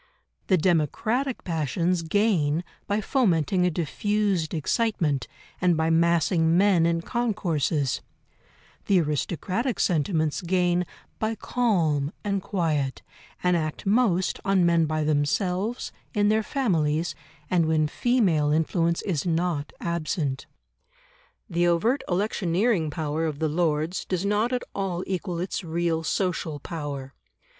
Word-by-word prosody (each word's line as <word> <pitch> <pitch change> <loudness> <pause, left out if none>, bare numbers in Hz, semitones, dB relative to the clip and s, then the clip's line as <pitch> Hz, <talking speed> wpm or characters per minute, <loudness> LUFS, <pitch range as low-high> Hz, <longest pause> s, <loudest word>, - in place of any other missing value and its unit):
The 190 - +4
democratic 190 - 0
passions 170 +2 0
gain 165 -4 +1 0.2
by 205 +1 0
fomenting 185 - +2
a - - +3
diffused 185 +1 0
excitement, 160 - 0 0.3
and 175 -2 +3
by 160 +1 +1
massing 165 0 +3
men 185 -4 +4
in 170 0 0
concourses; 165 - -1 0.9
the 195 -2 +4
aristocratic 180 - -1
sentiments 160 -2 +1
gain 180 0 +1 0.3
by 220 +1 -1
calm 165 - 0
and 200 -2 -1
quiet, 155 -9 -1 0.4
and 180 0 +3
act 155 +1 -3
most 195 -4 +2
on 195 -2 +3
men 170 -2 +3
by 155 0 -1
themselves, 180 +9 0 0.2
in 205 0 +3
their 215 +1 +3
families, 170 - 0 0.4
and 170 -3 +3
when 155 -1 +2
female 175 - +2
influence 165 +2 +1
is 180 -4 -1
not 165 -3 -1
absent. 155 -4 -2 1.0
The 175 -3 +1
overt 220 +11 +2
electioneering 185 -1 +1
power 155 0 -2
of 150 -2 -4
the 160 +1 0
Lords 160 +1 0
does 185 0 -2
not 210 +4 +1
at 250 -1 -1
all 185 -2 -2
equal 185 -2 -3
its 185 +2 -3
real 165 0 -1
social 165 -4 -1
power. 145 -4 -6
170 Hz, 120 wpm, -25 LUFS, 155-195 Hz, 1.0 s, The